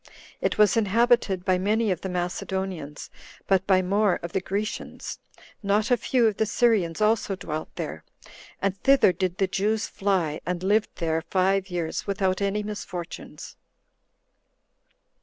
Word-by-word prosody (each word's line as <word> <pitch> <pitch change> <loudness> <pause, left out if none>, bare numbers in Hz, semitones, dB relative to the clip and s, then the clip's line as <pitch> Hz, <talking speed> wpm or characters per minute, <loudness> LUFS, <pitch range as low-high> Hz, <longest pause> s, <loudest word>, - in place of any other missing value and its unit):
It - - 0
was 210 -3 +5
inhabited 225 -3 +2
by 185 -1 +2
many 215 +2 +1
of 180 - -2
the 190 - -4
Macedonians, 180 -3 -4 0.3
but 190 -1 +2
by 185 -1 +4
more 200 +1 +2
of 170 - -5
the 190 - 0
Grecians; 205 +3 -4 0.4
not 210 +3 +1
a - - +7
few 245 0 +1
of 215 -3 +1
the 220 - +1
Syrians 205 -6 +2
also 215 -2 +2
dwelt 155 -4 -5
there; - - -5 0.6
and 195 -1 0
thither 270 -9 +5
did 180 0 -2
the 195 - +3
Jews 205 +3 0
fly, 185 -6 -1
and 180 0 -3
lived 210 +3 +2
there 160 -1 -1
five 195 +1 +1
years, 175 0 -3
without 190 -1 0
any 200 +1 0
misfortunes. 195 -4 -7
195 Hz, 145 wpm, -25 LUFS, 180-210 Hz, 0.6 s, a